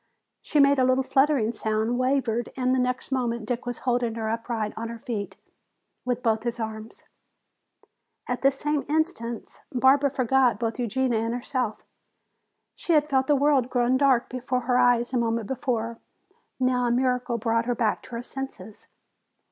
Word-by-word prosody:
She 300 - 0
made 280 -1 +5
a - - +4
little 255 +1 +3
fluttering 270 -4 +2
sound, 220 +2 -1
wavered, 255 -3 0
and 255 0 +1
the 260 - +2
next 250 +1 -1
moment 235 -4 -1
Dick 240 +1 -3
was 245 - -3
holding 240 -2 +1
her 220 -1 -3
upright 230 -2 -3
on 230 +1 -5
her 235 - -6
feet 200 -5 -5 0.7
with 250 -1 -2
both 225 -2 +2
his 235 0 -3
arms. 220 0 -6 1.2
At 250 - -2
this 275 0 +3
same 295 0 -1
instant 300 -8 -2
Barbara 270 +2 +4
forgot 260 -2 +2
both 230 +1 -2
Eugenia 245 0 0
and 230 +1 -1
herself. 245 -3 -3 0.9
She 340 - -1
had 300 -1 +4
felt 265 -2 +1
the 295 - +4
world 275 -3 +2
growing 245 0 +2
dark 265 -3 +3
before 255 0 -2
her 250 +1 +1
eyes 245 0 +3
a - - +2
moment 230 -1 0
before. 230 -2 -2 0.6
Now 250 -1 +2
a - - +1
miracle 250 -1 0
brought 230 0 0
her 245 - +1
back 225 -2 0
to - - -15
her 235 - -4
senses. 265 -5 -8
245 Hz, 170 wpm, -25 LUFS, 230-265 Hz, 1.2 s, made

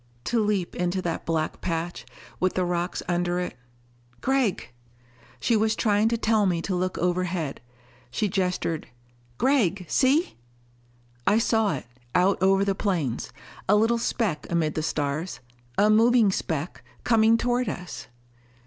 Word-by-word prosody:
To 230 -2 +1
leap 205 -4 -1
into 180 +1 -1
that 170 -2 -3
black 160 -1 -1
patch, 170 0 -3 0.3
with 185 0 +1
the 185 - +1
rocks 175 +1 -2
under 175 0 0
it.... 180 - -4 0.6
"Gregg 265 -7 0 0.4
" - - -31 0.3
She 235 - +2
was 220 0 +2
trying 210 0 +2
to 230 +1 +1
tell 220 -2 +2
me 175 -2 +1
to 195 - -2
look 185 0 -1
overhead. 180 -4 -1 0.5
She 125 - 0
gestured, 180 -4 -1 0.5
"Gregg, 205 - +2
see!" 280 - +2 0.9
I 210 - +5
saw 220 -5 +2
it, 135 - -7 0.3
out 185 +1 +3
over 195 +1 +4
the 200 - +1
plains, 175 - -2 0.4
a - - +6
little 225 +2 +3
speck 210 -9 -1
amid 160 -3 +1
the 155 - -2
stars. 155 0 -2 0.4
A 210 - +5
moving 225 -1 +5
speck, 160 -3 -3 0.2
coming 225 -1 +4
toward 245 +1 0
us! 145 -10 -7
185 Hz, 145 wpm, -26 LUFS, 170-220 Hz, 0.9 s, a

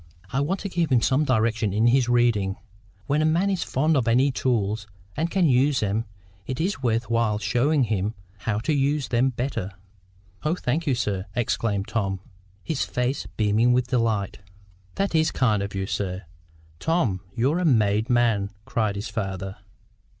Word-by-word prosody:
"I 135 - +1
want 175 +7 0
to 200 - -3
give 170 -5 -1
him 120 -3 +4
some 140 +3 +2
direction 115 -4 +1
in 110 +3 +2
his 120 0 +4
reading. 115 -6 +2 0.5
When 145 +5 +1
a - - +2
man 170 +6 +2
is 185 -3 -1
fond 155 +4 +1
of 125 -5 +1
any 130 +4 +4
tools, 110 -5 -1 0.3
and 165 +3 -1
can 185 0 +2
use 135 -1 +3
them, 105 +2 0 0.4
it 130 0 -4
is 180 -1 -1
worth 115 -2 0
while 115 -2 +2
showing 125 +8 +2
him 105 -1 -1 0.2
how 105 -1 -1
to 155 +6 0
use 140 0 +1
them 125 +2 +2
better." 120 -5 -3 0.7
"Oh, 155 +3 0
thank 155 +1 -2
you, 135 - +3
sir!" 100 -4 -2
exclaimed 105 -4 -1
Tom, 100 -3 -1 0.4
his 155 -4 -1
face 125 +2 -2
beaming 110 +3 +3
with 125 0 +1
delight. 115 -5 0 0.6
"That 195 -2 -1
IS 160 0 +3
kind 110 -9 +1
of 100 0 -4
you, 95 0 -1
sir! 95 -1 -3 0.6
Tom, 130 - 0
you're 140 +9 +1
a - - 0
made 110 -5 +2
man!" 115 -5 +2 0.2
cried 110 -3 0
the 100 - -3
father. 95 -4 -4
120 Hz, 170 wpm, -25 LUFS, 105-140 Hz, 0.7 s, him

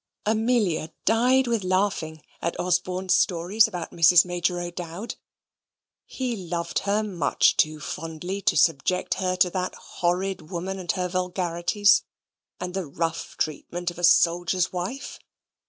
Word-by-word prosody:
Amelia 215 -7 +1
died 250 +4 +4
with 230 -4 0
laughing 185 -5 -1 0.2
at 170 - -3
Osborne's 180 +1 0
stories 180 +5 +3
about 180 -6 -6
Mrs. 170 +1 +6
Major 175 0 -1
O'Dowd. 175 +4 -6 0.9
He 255 -3 -3
loved 170 -3 -3
her 210 +2 +2
much 180 -9 +2
too 155 0 +1
fondly 165 +6 -5
to - - +2
subject 165 +3 +2
her 185 -1 0
to 180 -1 +3
that 185 0 -3
horrid 180 -1 -2
woman 190 +2 -4
and 175 -1 -1
her 180 -1 -1
vulgarities, 180 +2 +2 0.6
and 180 0 -5
the 190 -4 -3
rough 165 +3 -3
treatment 175 +3 -3
of 175 - -12
a - - -7
soldier's 175 +1 +3
wife. 185 +10 -5
180 Hz, 135 wpm, -25 LUFS, 170-195 Hz, 0.9 s, Mrs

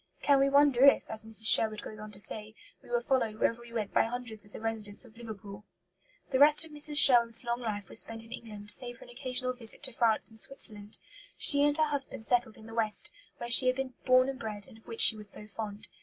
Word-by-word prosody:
Can 280 -1 +3
we 275 0 +2
wonder 280 -2 +3
if, 280 - +5
as 220 0 -2
Mrs. 220 0 -3
Sherwood 215 -1 +4
goes 215 - -10
on 215 0 -10
to 195 - -13
say, 215 +1 -4 0.3
"we - - -19
were 240 0 -2
followed 240 -4 -1
wherever 230 +2 -2
we 235 0 -15
went 220 -3 -5
by - - +2
hundreds 230 -2 -6
of 205 - -17
the - - -10
residents 220 0 -5
of 225 -2 -19
Liverpool"? 210 -3 -11 0.7
The 260 - 0
rest 300 +2 +6
of 320 - -16
Mrs. 295 0 +1
Sherwood's 235 -4 +5
long 240 0 -4
life 205 -4 -5
was 225 - -2
spent 225 0 -3
in 225 - -18
England, 210 -4 -7
save 245 -1 0
for - - -15
an - - -16
occasional 255 0 -3
visit 240 +1 0
to 265 - 0
France 230 -2 0
and 220 - -6
Switzerland. 210 -5 -4 0.4
She 285 -1 +7
and 290 +1 +2
her 310 - +2
husband 285 -6 -5
settled 245 -2 -1
in 220 - -15
the 225 - -12
west, 220 -2 0 0.3
where 240 - -7
she 255 +2 +7
had 255 - +1
been 265 -1 -5
born 255 0 +3
and 270 -2 -6
bred, 210 -2 -4
and 220 - -17
of - - -29
which 230 - -2
she 225 - +7
was 210 -1 -3
so 210 - -2
fond. 210 +1 -9
230 Hz, 245 wpm, -29 LUFS, 215-255 Hz, 0.7 s, She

